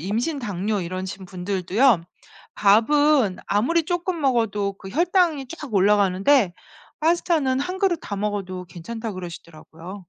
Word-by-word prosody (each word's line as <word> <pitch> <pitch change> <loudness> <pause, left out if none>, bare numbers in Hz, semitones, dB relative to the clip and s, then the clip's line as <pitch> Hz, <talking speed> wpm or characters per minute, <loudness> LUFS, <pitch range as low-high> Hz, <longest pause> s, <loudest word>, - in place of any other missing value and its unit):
임신 230 - -2
당뇨 205 -3 -2
이러신 185 +2 -5
분들도요. 190 +4 +1 0.5
밥은 235 +1 +3
아무리 295 +11 +1
쪼끔 350 0 -2
먹어도 220 -7 0
그 195 0 -11
혈당이 340 - +1
쫙 300 -7 -8
올라가는데 200 +2 +3 0.5
파스타는 315 -5 +1
한 365 +6 -3
그릇 385 -3 +2
다 205 - -5
먹어도 195 -3 -3
괜찮다 220 +7 -6
그러시더라고요. 170 +1 -10
210 Hz, 310 characters per minute, -23 LUFS, 190-290 Hz, 0.5 s, 밥은